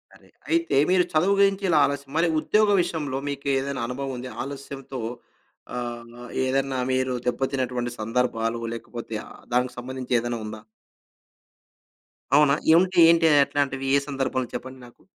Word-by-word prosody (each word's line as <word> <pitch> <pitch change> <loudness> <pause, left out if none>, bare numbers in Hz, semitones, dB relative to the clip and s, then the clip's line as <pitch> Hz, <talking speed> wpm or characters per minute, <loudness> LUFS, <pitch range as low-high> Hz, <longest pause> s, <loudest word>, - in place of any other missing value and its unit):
అరే! - - -20 0.2
అయితే 335 0 +1
మీరు 185 0 +4
చదువు 175 +6 +3
గురించి 195 0 +3
ఇలా 155 -3 +4
ఆలస్యం. 140 -1 -4
మరి 170 - +3
ఉద్యోగ 215 +6 +3
విషయంలో 150 -6 -3
మీకు 140 0 -5
ఏదైనా 135 -1 -3
అనుభవం 135 +2 -4
ఉంది. 125 +1 -6
ఆలస్యంతో 135 -1 -7 0.8
ఆహ్, 120 0 -7 0.2
ఏదన్నా 135 0 0
మీరు 130 0 0
దెబ్బతినటువంటి 125 -1 -1
సందర్భాలు, 115 0 -1
లేకపోతే 115 -1 -7
ఆహ్, - - -14
దానికి 125 +1 +1
సంబంధించి 130 0 -3
ఏదైనా 120 0 -3
ఉందా? 110 0 -7 1.7
అవునా? 145 -1 +5 0.2
ఏంటి 185 +2 +3
ఏంటి? 165 -1 +5 0.2
ఎట్లాంటివి? 135 -2 -1
ఏ - - +4
సందర్భంలో 135 -3 -2
చెప్పండి 130 +1 -7
నాకు? 120 - -18
135 Hz, 135 wpm, -25 LUFS, 125-145 Hz, 1.7 s, అవునా